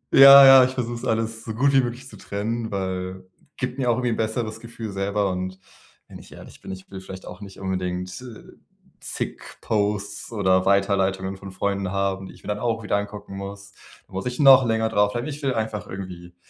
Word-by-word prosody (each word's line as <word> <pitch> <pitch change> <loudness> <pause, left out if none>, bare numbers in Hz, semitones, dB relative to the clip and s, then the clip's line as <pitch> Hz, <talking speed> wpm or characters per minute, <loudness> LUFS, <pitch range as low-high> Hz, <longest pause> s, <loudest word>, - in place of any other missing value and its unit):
Ja, 140 0 +11
ja, 135 -1 +9
ich 130 +1 -1
versuche 120 -2 -2
es 120 - -7
alles 115 0 -1
so 110 -1 -6
gut 140 +3 +2
wie 135 - +6
möglich 120 +2 -5
zu - - -12
trennen, 110 +3 -4
weil, 95 -1 -4 0.3
gibt 130 +1 -4
mir 125 -2 +1
auch 115 - +3
irgendwie 125 -1 -1
‘n - - 0
besseres 110 0 -2
Gefühl 115 -2 -8
selber 100 0 -1
und 95 +1 -4 0.5
wenn - - -11
ich - - -16
ehrlich - - -13
bin, - - -8
ich 95 0 -10
will 95 -1 -7
vielleicht 95 0 -10
auch 90 +2 -10
nicht 100 -1 -11
unbedingt, 90 0 -3
äh, 120 -4 -11 0.6
zig - - -5 0.2
Posts 105 0 -2
oder 95 -2 +2
Weiterleitungen 95 -1 +1
von 95 0 -10
Freunden 100 0 -2
haben, 95 -1 -2
die - - -12
ich - - -20
mir - - -11
dann 105 0 -2
auch 115 -2 -1
wieder 100 - 0
angucken 100 -1 -6
muss, 100 +1 -8 0.4
muss 95 +6 -5
ich 125 +2 -5
noch 135 -2 +8
länger 110 0 +1
drauf 105 -1 +2
bleiben, 120 +1 -3
ich 150 0 -6
will 135 -2 -1
einfach 110 -3 -3
irgendwie 90 -2 -8
105 Hz, 210 wpm, -23 LUFS, 95-115 Hz, 0.6 s, Ja